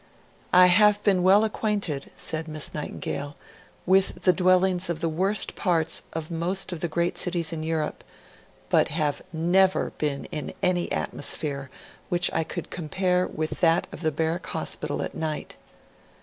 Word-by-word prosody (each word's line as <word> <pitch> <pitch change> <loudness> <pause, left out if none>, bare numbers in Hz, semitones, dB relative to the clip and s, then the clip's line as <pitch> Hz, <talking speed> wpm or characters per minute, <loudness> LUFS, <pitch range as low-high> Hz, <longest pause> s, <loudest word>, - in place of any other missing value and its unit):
'I 180 0 +8
have 205 +3 +5
been 195 -3 +3
well 195 +4 +5
acquainted,' 205 -9 -2
said 160 0 -2
Miss 155 -1 -2
Nightingale, 145 -1 -5 0.5
'with 190 +1 +3
the 185 - +5
dwellings 185 0 +2
of 170 -2 -2
the 165 - 0
worst 190 +6 +1
parts 170 -4 0
of 160 0 -5
most 175 +4 -1
of 175 - -5
the 175 - -1
great 170 +2 -1
cities 170 -2 -1
in 160 - -4
Europe, 160 -1 -2 0.7
but - - +4
have 150 -2 -1
never 180 +4 +2
been 145 -2 -1
in 155 -4 -5
any 180 -1 +1
atmosphere 140 -3 -1 0.4
which 175 0 +2
I 160 - +1
could - - -6
compare 180 +2 0
with 155 0 -4
that 165 -1 +3
of - - -8
the 160 -2 +1
Barrack 160 +3 -2
Hospital - - -2
at - - -5
night.' 155 -1 -4
170 Hz, 155 wpm, -25 LUFS, 155-185 Hz, 0.7 s, I